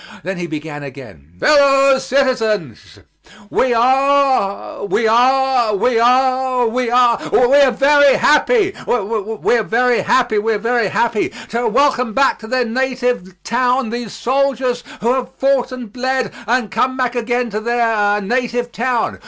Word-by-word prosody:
Then 190 +1 -4
he 175 -1 -5
began 155 -2 -7
again: 130 - -12
"Fellow 275 -2 +4
citizens: 225 - -2 0.5
We 260 - +1
are 265 -4 +1
we 220 +2 0
are 250 -1 +2
we 230 +3 +1
are 255 +1 +2
we 245 +1 -2
are 240 -1 +2
We - - +2 0.2
are 280 -2 +5
very 285 +1 +4
happy 390 +6 +2
we 220 0 -1
are - - -1
very 245 +2 +1
happy 245 -4 +1
we 225 +2 -1
are - - -1
very 230 0 0
happy 225 +2 -1 0.2
to 235 +1 -2
welcome 255 -1 +1
back 275 +2 +1
to 220 - -11
their 255 +1 0
native 245 -6 -3
town 250 0 0
these 240 -3 -5
soldiers 255 -1 -1 0.2
who 235 +3 +1
have 260 0 -4
fought 270 -1 0
and 245 -5 -9
bled 260 +1 -2
and 240 -3 -1
come 260 +7 -1
back 250 -1 -2
again 240 0 -2
to 210 - -3
their 220 -3 0
native 240 +2 -2
town. 240 0 -2
245 Hz, 150 wpm, -17 LUFS, 225-260 Hz, 0.5 s, are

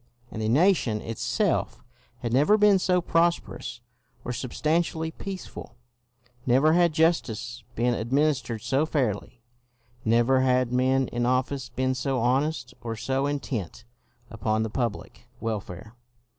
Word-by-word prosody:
And 110 - -5
the 110 - 0
nation 140 - +3
itself 115 +1 -1 0.4
had 120 -1 -2
never 150 +11 +5
been 205 -2 +5
so 180 -1 +2
prosperous 165 -8 0 0.4
or 125 - -2
substan 150 +6 0
tially 160 -1 -3
peaceful; 190 -10 -8 0.7
never 135 +6 +4
had 175 -1 +4
justice 125 -8 0
been 120 +1 +1
ad 115 0 -4
ministered 135 -6 +1
so 140 +4 +1
fairly; 120 -5 -2 0.6
never 120 +4 +3
had 125 -1 +2
men 130 +1 +2
in 120 0 -1
office 130 0 0
been 130 +2 -1
so 130 0 -1
honest 130 +2 0
or 115 -1 -4
so 135 +5 -1
intent 120 - -4 0.5
upon 110 0 0
the 110 - -4
public 115 0 -4
welfare. 110 -1 -5
130 Hz, 130 wpm, -26 LUFS, 115-150 Hz, 0.7 s, never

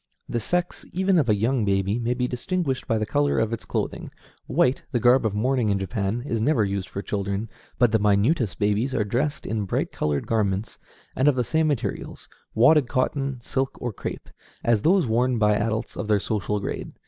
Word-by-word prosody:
The 120 - -1
sex, 175 +10 -2
even 190 0 +3
of 130 -6 +1
a 105 - +5
young 115 +4 +1
baby, 100 +2 +1
may 120 +1 0
be 125 0 0
distinguished 135 +2 -2
by 115 - +1
the 110 - -1
color 145 +5 +1
of 110 0 +1
its 115 - -5
clothing. - - -3 0.4
White, 125 +2 +2
the 120 - +1
garb 120 0 +4
of 105 - -4
mourning 125 +1 +1
in 100 - +2
Japan, 100 +3 -2
is 115 -6 -1
never 115 -3 +2
used 100 -1 -3
for 100 - -5
children, 100 +2 -3 0.3
but 120 -3 +4
the 110 - +3
minutest 105 - +2
babies 105 +5 0
are 105 - +2
dressed 130 +8 -1
in 110 -2 -2
bright - - -1
colored 75 -2 -1
garments, 105 -2 -1 0.4
and 130 - +2
of 145 - +5
the 125 - +1
same 160 +5 +1
materials 145 -6 -3 0.3
wadded 130 +4 +5
cotton, 135 +1 -1
silk, 135 +3 -2
or 120 -3 -3
crêpe - - -7 0.3
as 115 -3 +2
those 180 - +4
worn 120 +2 +1
by 105 -1 +3
adults 110 +1 -1
of - - -4
their 105 -1 +3
social 105 0 -1
grade. 100 - -5
115 Hz, 200 wpm, -24 LUFS, 105-130 Hz, 0.4 s, a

